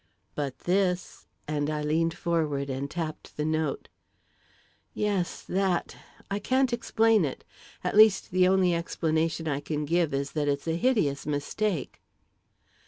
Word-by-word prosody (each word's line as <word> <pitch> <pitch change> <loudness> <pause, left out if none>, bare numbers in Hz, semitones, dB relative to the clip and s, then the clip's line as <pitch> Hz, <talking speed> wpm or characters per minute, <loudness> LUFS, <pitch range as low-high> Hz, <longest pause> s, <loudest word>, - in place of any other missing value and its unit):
"But 140 -3 -3
this," 180 -1 0 0.2
and 145 -1 -1
I 150 -1 -2
leaned 165 +2 +1
forward 150 -5 -1
and 135 +2 -3
tapped 160 -1 -6
the 150 - -1
note. 155 -2 -1 1.1
"Yes 200 -4 -1
that 190 -2 0 0.4
I 200 - 0
can't 260 +3 +1
explain 225 -3 +3
it. 140 -4 -3 0.4
At - - -1
least, 215 -2 +6
the 185 0 +4
only 185 -1 +3
explanation 160 -1 -1
I 140 -2 0
can 150 +1 -3
give 170 +1 +1
is 140 0 -2
that 150 -2 -1
it's 140 +2 -1
a 160 - +1
hideous 170 - +1
mistake." 150 +3 -2
165 Hz, 140 wpm, -28 LUFS, 150-190 Hz, 1.1 s, least